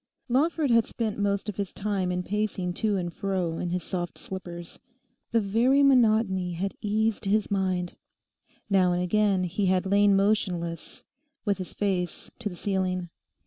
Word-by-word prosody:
Lawford 290 +2 +2
had 230 -1 +4
spent 220 -3 -3
most 200 0 0
of 210 - -4
his 200 -2 -3
time 195 -3 -1
in 180 0 -1
pacing 200 -2 -2
to 210 +1 0
and 175 -2 -3
fro 185 -4 -2
in 175 - -2
his 180 0 -2
soft 175 0 -4
slippers. 175 -2 -8 0.5
The 230 - +3
very 235 +7 +3
monotony 220 -9 +3
had 190 +3 -2
eased 215 +1 0
his 205 +1 +1
mind. 185 -3 -1 0.7
Now 185 -3 +3
and 175 +1 0
again 200 0 +2
he 185 +3 -1
had 185 0 +2
lain 200 +1 +4
motionless, 185 -4 -1 0.4
with 200 -2 +1
his 185 - -6
face 185 -4 -2
to 220 -3 -3
the 180 - -9
ceiling. 185 -2 -1
195 Hz, 160 wpm, -27 LUFS, 180-210 Hz, 0.7 s, had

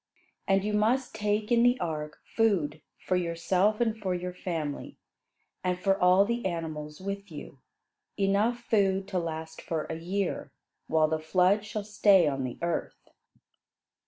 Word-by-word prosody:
And 195 0 +3
you 210 0 -1
must 230 +5 +1
take 210 +1 -1
in 235 -1 +5
the 245 +1 +4
ark 150 -2 -4 0.2
food 170 -10 +1 0.2
for 185 - -1
yourself 180 +4 +1
and 225 -2 +1
your 180 -3 -3
family, 160 -5 -4 0.7
and 180 -1 0
for 195 +1 +2
all 180 +2 +6
the 235 +2 -2
animals 155 -4 -4
with 200 +1 -5
you; 145 -3 -9 0.6
enough 205 +4 +2
food 195 -4 +1
to 190 -2 0
last 160 -1 -5
for 160 -2 -3
a 160 - -4
year, 190 +3 -2 0.4
while 155 -1 +3
the 160 0 -1
flood 185 +5 +3
shall 215 0 -4
stay 200 -4 +4
on 135 -2 -1
the 125 - -5
earth." 170 -1 -3
185 Hz, 150 wpm, -28 LUFS, 160-210 Hz, 0.7 s, all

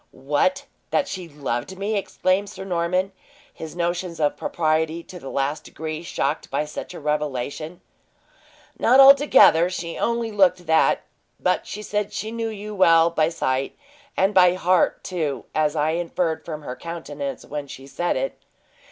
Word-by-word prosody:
"What! 145 - 0 0.2
That 280 - +1
she 185 -8 -6
loved 145 +3 -4
me!" 205 +3 -2
exclaimed 195 0 0
Sir 190 -1 -8
Norman, 180 +1 0 0.4
his 160 0 -8
notions 175 0 -2
of 150 -1 +1
propriety 160 0 -1
to 180 - -11
the 135 - -8
last 140 +2 -1
degree 155 0 -6
shocked 155 -3 -2
by 145 +2 -1
such 150 +4 -7
a - - -7
revelation. 150 +2 -3 1.0
"Not 255 +3 +5
altogether, 270 - +7
she 170 -2 -5
only 235 -1 0
looked 185 -3 +3
that; 160 0 +3 0.4
but - - 0
she 210 - -6
said 210 0 -2
she 220 - -4
knew 230 -1 -3
you 210 0 -7
well 165 -4 +5
by 160 -1 +2
sight, 135 -5 -2 0.4
and 195 +2 +2
by 180 -2 +6
heart, 185 0 +2
too, 155 -7 -3
as 155 -1 +1
I 155 +1 +1
inferred 165 -1 -1
from 155 -2 -7
her 125 - -6
countenance 145 -5 -6
when 145 -1 -5
she 135 0 -10
said 175 +5 -1
it. - - -3
170 Hz, 160 wpm, -23 LUFS, 150-190 Hz, 1.0 s, altogether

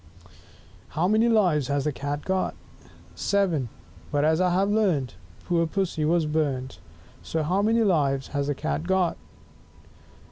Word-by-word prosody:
5 90 - -22 0.6
How 170 +3 +2
many 220 +3 +3
Lives 180 - +3
has 140 0 0
the 150 - 0
Cat 145 +2 -4
got? 190 0 -1 0.6
SEVEN! 175 - 0 0.4
But, 145 0 +2
as 160 +3 +3
I 180 - +3
have 195 +3 +1
learnt, 175 - +1 0.3
Poor 170 -1 +1
Pussy 170 -3 -1
was 165 0 +2
burnt. 145 -4 -2 0.4
So 160 -1 -2
how 180 +6 +1
many 225 +2 +3
Lives 140 -9 +1
has 140 -1 -2
the 145 - -1
Cat 160 +5 -3
got? 190 -2 +2
160 Hz, 150 wpm, -25 LUFS, 145-190 Hz, 0.6 s, many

